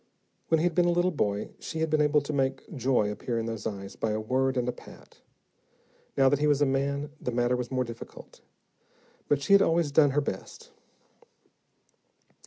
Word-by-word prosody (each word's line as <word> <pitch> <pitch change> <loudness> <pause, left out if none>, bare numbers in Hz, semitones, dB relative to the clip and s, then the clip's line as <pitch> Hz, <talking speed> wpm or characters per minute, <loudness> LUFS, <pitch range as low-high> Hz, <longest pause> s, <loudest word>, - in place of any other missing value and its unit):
When 160 - +3
he - - 0
had 175 -1 +1
been 175 +2 +3
a - - +3
little 175 +1 +2
boy, 105 - -1
she 165 - -6
had 160 -1 -1
been 155 -1 +3
able 150 0 +3
to 145 +2 -5
make 135 +3 -2
joy 125 -5 +1
appear 115 +3 -3
in 115 - -2
those 115 -2 -4
eyes 100 -1 -6
by 110 - -2
a 110 - -1
word 130 +4 0
and 125 -1 0
a - - +1
pat; - - -16 1.0
now 135 -1 +5
that 145 +1 +3
he 150 - +2
was 145 -2 +3
a 145 - +4
man, 140 +2 -1
the - - -3
matter 120 +1 +1
was 125 -1 -4
more 130 -1 0
difficult, 115 -1 -11 0.9
but 140 -1 +1
she 200 - +3
had 200 - +8
always 165 -4 +2
done 145 0 +5
her 145 +2 +1
best. 95 -9 -7
135 Hz, 200 wpm, -28 LUFS, 120-150 Hz, 1.0 s, had